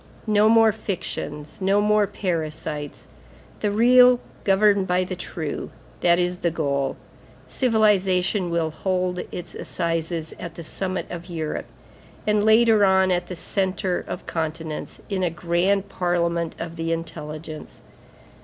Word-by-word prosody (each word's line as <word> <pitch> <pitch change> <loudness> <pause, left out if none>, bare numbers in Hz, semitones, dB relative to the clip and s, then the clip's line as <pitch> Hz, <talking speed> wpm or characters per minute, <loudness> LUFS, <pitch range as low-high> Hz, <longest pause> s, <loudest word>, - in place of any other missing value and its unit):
No 215 0 +4
more 225 -1 +6
fictions; 185 -6 -5
no 195 +2 +3
more 210 0 +3
parasites. 155 -6 -4 0.5
The 210 - 0
real 245 +3 +6 0.2
governed 200 0 +4
by 180 +1 +2
the 185 0 -4
true, 160 -4 -5 0.3
that 175 -1 +4
is 180 0 0
the 170 - +1
goal. 140 -4 -1 0.5
Civilization 195 -5 +2
will 165 -2 0
hold 180 +2 -1
its 175 -1 -6
assizes 165 -1 -3
at 170 -1 -7
the 170 - -7
summit 185 +3 -3
of 175 0 -7
Europe, 160 -3 -4 0.6
and, 210 -1 +2
later 220 -1 +5
on, 190 -1 +4
at 175 0 0
the 180 - -6
centre 190 +1 -1
of - - -6
continents, 160 -1 -4
in 195 -2 -2
a 180 - +2
grand 180 +4 0
parliament 170 -3 -1
of 165 0 -6
the 165 0 -2
intelligence. 155 -1 -6
180 Hz, 135 wpm, -23 LUFS, 165-200 Hz, 0.6 s, more